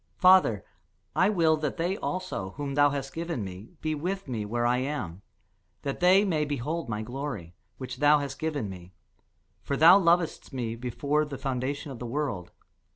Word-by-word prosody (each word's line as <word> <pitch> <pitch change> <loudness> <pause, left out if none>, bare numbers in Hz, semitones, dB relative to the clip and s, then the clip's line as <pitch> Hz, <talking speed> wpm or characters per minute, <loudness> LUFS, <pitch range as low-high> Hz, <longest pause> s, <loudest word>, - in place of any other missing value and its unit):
Father, 180 - +5 0.5
I 185 - +4
will 165 -6 +3
that 150 0 -3
they 175 +3 0
also, 185 - -4
whom 145 -2 -3
thou 145 +1 +5
hast 140 -1 -4
given 165 -7 -3
me, 95 +2 -8
be 155 0 -1
with 180 +4 -3
me 115 -5 -3
where 120 +3 -1
I 120 +1 +3
am; 125 - -3 0.6
that 140 -1 -3
they 185 +3 +5
may 160 -6 +1
behold 150 +1 -3
my 105 -1 -2
glory, 120 - -5 0.2
which 130 -1 -6
thou 150 +2 +5
hast 140 -2 -5
given 155 -8 -2
me: 90 -1 -10 0.7
for 140 - -2
thou 170 +6 +8
lovedst 170 -2 +1
me 120 -3 -3
before 140 +5 0
the 145 -2 -6
foundation 135 +2 -3
of 125 - -8
the 120 - -5
world. 120 - -3
145 Hz, 175 wpm, -28 LUFS, 120-160 Hz, 0.7 s, thou